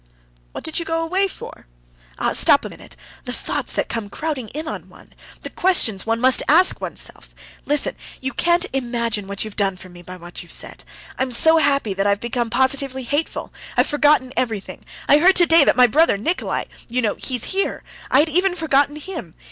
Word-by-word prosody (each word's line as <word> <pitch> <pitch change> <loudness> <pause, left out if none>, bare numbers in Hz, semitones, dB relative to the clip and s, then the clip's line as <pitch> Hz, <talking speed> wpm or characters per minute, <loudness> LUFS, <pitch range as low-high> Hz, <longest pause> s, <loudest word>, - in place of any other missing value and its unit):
"What - - -8
did 320 - -2
you - - -3
go 330 0 -2
away 375 +4 +1
for?" 375 - -11 0.5
"Ah, - - 0
stop - - +4
a - - -5
minute! - - -13
Ah, - - -20
the - - -4
thoughts - - -2
that - - -1
come 225 -3 -4
crowding 275 -4 -4 0.2
on 315 - -7
one! - - -18 0.3
The - - -8
questions 235 - +2
one 225 0 0
must 255 +1 +4
ask 345 +6 +4
oneself! - - -6 0.3
Listen. 295 0 0 0.2
You 265 +1 -4
can't 345 +1 +2
imagine 235 -5 -2
what 200 +1 -3
you've 215 - -9
done 195 -3 0
for 185 +1 -12
me 175 0 -13
by 180 +1 -10
what 175 0 -9
you 175 - -14
said. - - -4 0.4
I'm 260 -1 -1
so 320 +7 +5
happy 280 -8 +1
that 195 +1 -1
I've 200 0 +1
become 235 +1 -2
positively 265 +1 0
hateful; 290 +6 -3 0.2
I've - - +4
forgotten 290 -3 +2
everything. 225 -6 -3 0.2
I 290 - +6
heard 375 +4 +5
today 335 -3 +6
that - - +3
my 250 - +8
brother 295 -1 +3
Nikolay... 325 - -2 0.2
you 250 +1 -1
know, 210 - +1
he's 250 -4 -2
here... 390 +1 -1 0.3
I 265 - +5
had 320 - 0
even 360 +3 +1
forgotten 290 -3 +1
him. 305 - -8
265 Hz, 195 wpm, -20 LUFS, 220-320 Hz, 0.5 s, my